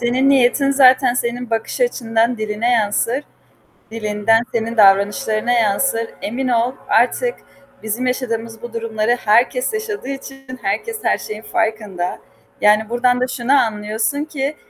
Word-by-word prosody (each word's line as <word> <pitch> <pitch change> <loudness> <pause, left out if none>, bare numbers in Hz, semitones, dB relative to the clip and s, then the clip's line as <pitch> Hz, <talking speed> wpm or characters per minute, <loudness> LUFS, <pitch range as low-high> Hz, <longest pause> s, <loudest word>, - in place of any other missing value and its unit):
Senin 250 +3 +1
niyetin 275 +1 +3
zaten 255 -2 +5
senin 245 0 -3
bakış 225 - -3
açından 230 - 0
diline 215 +2 -1
yansır, 230 +4 0 0.7
dilinden 225 0 +1
senin 230 0 -2
davranışlarına 210 +4 +3
yansır. 230 +1 +1 0.2
Emin 255 +4 -2
ol, 240 +1 +1 0.2
artık - - +2 0.5
bizim 225 +4 -2
yaşadığımız 230 -3 -3
bu 240 - -8
durumları 230 +1 -1
herkes 240 - +2
yaşadığı 435 - -4
için 270 -1 -8
herkes 220 - -2
her - - +2
şeyin 215 +1 -7
farkında. 210 -6 -2 0.4
Yani 210 +1 +3
buradan 245 +1 +1
da 255 - +1
şunu 250 +1 -1
anlıyorsun 220 +3 0
ki 290 -1 -4
235 Hz, 130 wpm, -18 LUFS, 220-260 Hz, 0.7 s, zaten